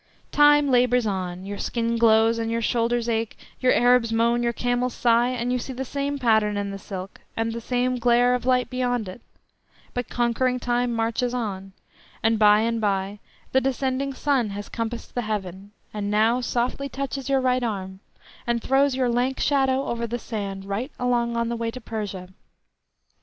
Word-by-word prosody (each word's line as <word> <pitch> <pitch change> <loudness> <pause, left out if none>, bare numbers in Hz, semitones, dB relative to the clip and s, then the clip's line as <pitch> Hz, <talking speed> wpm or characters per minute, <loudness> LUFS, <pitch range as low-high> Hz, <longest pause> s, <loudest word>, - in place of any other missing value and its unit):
Time 295 -1 +5
labours 250 -1 +3
on; 185 -2 -3
your 200 0 -6
skin 235 -1 -1
glows 225 0 +4
and 225 0 -2
your 230 0 0
shoulders 235 +1 0
ache, 225 -1 -1 0.2
your 255 -1 +3
Arabs 245 -1 +4
moan, 235 +1 +2
your 235 0 +1
camels 245 +1 -1
sigh, 235 0 +3
and 250 0 -1
you 250 - 0
see 260 - -6
the 265 +1 -4
same 280 +1 -2
pattern 220 -5 +2
in 200 0 -2
the 195 - -6
silk, 190 0 -8 0.2
and 225 0 -1
the 235 - -5
same 250 +1 0
glare 245 +1 +4
of 250 - -1
light 250 0 +2
beyond, 245 -5 -2 0.7
but 245 -1 -3
conquering 250 +1 0
Time 245 0 0
marches 230 +2 -1
on, 195 -5 -4 0.5
and 225 0 +2
by 210 0 +6
and 230 0 0
by 200 0 -1 0.3
the 265 - +3
descending 265 +1 -1
sun 265 -4 0
has 205 +1 -6
compassed 230 +1 -5
the 245 - -1
heaven, 200 -3 -4 0.2
and 205 -1 -3
now 220 +4 +3
softly 250 +3 -1
touches 275 0 -4
your 270 -1 +3
right 255 -1 +1
arm, 190 -5 -4 0.5
and 235 -1 0
throws 270 0 +3
your 255 -1 +1
lank 245 +2 0
shadow 270 -1 +2
over 235 0 -2
the 240 +2 -3
sand 200 -4 -5
right 210 +8 -3
along 240 -1 0
on 235 0 0
the 235 - -2
way 230 0 -2
to 255 - -7
Persia. 205 -6 -5
235 Hz, 180 wpm, -24 LUFS, 220-250 Hz, 0.7 s, by